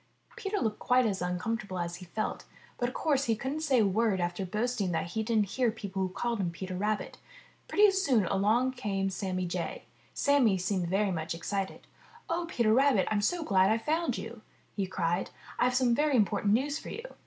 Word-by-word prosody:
Peter 405 Hz, +1 st, -3 dB
looked 220 Hz, -, -1 dB
quite 250 Hz, 0 st, +3 dB
as 195 Hz, -4 st, -1 dB
uncomfortable 185 Hz, +2 st, -2 dB
as 175 Hz, 0 st, -3 dB
he 180 Hz, -, -10 dB
felt, 215 Hz, +5 st, -3 dB, 0.3 s
but 245 Hz, -, +1 dB
of 255 Hz, -, -12 dB
course 280 Hz, -3 st, +1 dB
he 225 Hz, -, +2 dB
couldn't 265 Hz, +7 st, -3 dB
say 280 Hz, -5 st, +2 dB
a -, -, +4 dB
word 200 Hz, 0 st, +1 dB
after 175 Hz, +2 st, -2 dB
boasting 215 Hz, -1 st, -1 dB
that 165 Hz, 0 st, -1 dB
he 220 Hz, -, -1 dB
didn't 220 Hz, -3 st, +1 dB
hear 250 Hz, +1 st, +1 dB
people 200 Hz, -3 st, -4 dB
who 190 Hz, -, 0 dB
called 230 Hz, +5 st, -2 dB
him 180 Hz, -3 st, 0 dB
Peter 185 Hz, +2 st, -6 dB
Rabbit. 210 Hz, +3 st, -2 dB, 0.5 s
Pretty 415 Hz, 0 st, +5 dB
soon 275 Hz, -, +2 dB
along 215 Hz, +8 st, +2 dB
came 195 Hz, -6 st, -2 dB
Sammy 185 Hz, -1 st, -2 dB
Jay. 175 Hz, -1 st, -4 dB, 0.3 s
Sammy 270 Hz, -9 st, +3 dB
seemed 185 Hz, -1 st, -1 dB
very 195 Hz, +3 st, +1 dB
much 165 Hz, -1 st, -3 dB
excited. 195 Hz, +3 st, -4 dB, 0.5 s
*'0h, 340 Hz, 0 st, -1 dB
Peter 235 Hz, -8 st, +2 dB
Rabbit, 265 Hz, -6 st, +4 dB
I'm 210 Hz, -1 st, +2 dB
so 345 Hz, +10 st, 0 dB
glad 190 Hz, -7 st, +3 dB
I've 225 Hz, +1 st, 0 dB
found 310 Hz, -5 st, 0 dB
you!" 225 Hz, 0 st, -7 dB, 0.3 s
he 195 Hz, -2 st, -1 dB
cried. 175 Hz, 0 st, -1 dB, 0.3 s
"I've 250 Hz, 0 st, +3 dB
some 250 Hz, -2 st, +3 dB
very 295 Hz, +2 st, +2 dB
important 205 Hz, -2 st, +2 dB
news 285 Hz, +6 st, +1 dB
for -, -, -9 dB
you!" 460 Hz, -, -6 dB
215 Hz, 200 wpm, -30 LUFS, 190-255 Hz, 0.5 s, Pretty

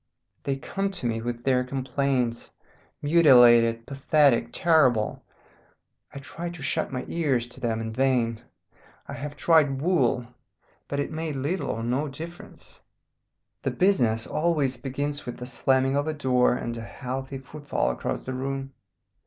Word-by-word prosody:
They 140 Hz, -, -1 dB
come 195 Hz, +8 st, -3 dB
to 185 Hz, -6 st, -5 dB
me 115 Hz, -1 st, -1 dB
with 120 Hz, 0 st, -4 dB
their 130 Hz, -1 st, +2 dB
complaints, 130 Hz, -2 st, -1 dB, 0.5 s
mutilated, 120 Hz, -7 st, +6 dB
pathetic, 140 Hz, -1 st, +2 dB
terrible. 130 Hz, -, +2 dB, 0.9 s
I -, -, -10 dB
try 165 Hz, +5 st, -6 dB
to 170 Hz, -4 st, -9 dB
shut -, -, -1 dB
my 125 Hz, -1 st, -4 dB
ears 135 Hz, -8 st, 0 dB
to 125 Hz, -, -12 dB
them 115 Hz, -3 st, -1 dB
in 110 Hz, 0 st, -4 dB
vain. 120 Hz, -3 st, +1 dB, 0.7 s
I -, -, -6 dB
have 145 Hz, +1 st, -6 dB
tried 145 Hz, -3 st, +3 dB
wool, 135 Hz, -7 st, +1 dB, 0.6 s
but 140 Hz, -, -3 dB
it 145 Hz, -, -2 dB
made 160 Hz, -1 st, -3 dB
little 145 Hz, +8 st, -2 dB
or 115 Hz, -, -3 dB
no 130 Hz, +6 st, 0 dB
difference. 165 Hz, +5 st, -10 dB, 0.8 s
"The -, -, -1 dB
business 120 Hz, -, +2 dB
always 150 Hz, -5 st, 0 dB
begins 145 Hz, +3 st, -4 dB
with 120 Hz, -, -5 dB
the 125 Hz, -, -7 dB
slamming 130 Hz, +1 st, +1 dB
of 145 Hz, +2 st, 0 dB
a 155 Hz, -, -2 dB
door 125 Hz, -4 st, +2 dB
and 120 Hz, -1 st, -4 dB
a -, -, -5 dB
healthy 130 Hz, +3 st, -5 dB
footfall 145 Hz, +2 st, -2 dB
across -, -, -4 dB
the 130 Hz, -, -5 dB
room. 135 Hz, +1 st, -4 dB
135 Hz, 150 wpm, -26 LUFS, 125-150 Hz, 0.9 s, mutilated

